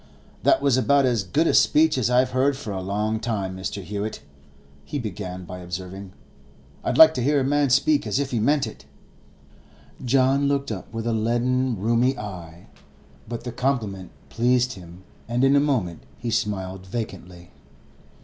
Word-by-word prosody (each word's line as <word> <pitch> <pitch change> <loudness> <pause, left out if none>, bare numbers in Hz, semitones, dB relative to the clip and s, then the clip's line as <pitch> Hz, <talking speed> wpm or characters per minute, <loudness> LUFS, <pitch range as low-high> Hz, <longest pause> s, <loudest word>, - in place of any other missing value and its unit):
'That - - +3
was 140 -3 +3
about 135 +3 +3
as 120 -4 +1
good 140 - 0
a - - +2
speech 155 +1 +4
as 125 -3 0
I've 125 +1 +3
heard 130 +2 +1
for 115 -6 -6
a 95 - -4
long 105 +3 -1
time, 105 -5 -3
Mr. 95 +1 -5
Hewett,' 105 +3 -5 0.6
he 145 - -5
began 90 -6 -6
by 90 0 -8
observing. 95 +2 -7 0.7
'I - - 0
like 160 0 +8
to 130 - -2
hear 145 +3 +2
a - - 0
man 145 +1 +2
speak 135 0 +3
as 105 - 0
if 140 -1 -1
he 120 - 0
meant 140 +6 +2
it.' - - -10 1.2
John 135 +2 +3
looked 140 -3 -1
up 100 -4 -7
with 115 0 -5
a 120 - 0
leaden, 120 +3 0
rheumy 120 +6 +1
eye, 90 -5 -8 0.6
but 120 -1 -5
the 120 - -5
compliment 115 -7 -2 0.2
pleased 125 +1 +1
him, 90 0 -13 0.2
and 120 +2 0
in 135 +1 +5
a - - +6
moment 125 - -1 0.2
he 120 -1 -4
smiled 95 -3 -2
vacantly. 90 -5 -7
115 Hz, 170 wpm, -24 LUFS, 95-130 Hz, 1.2 s, like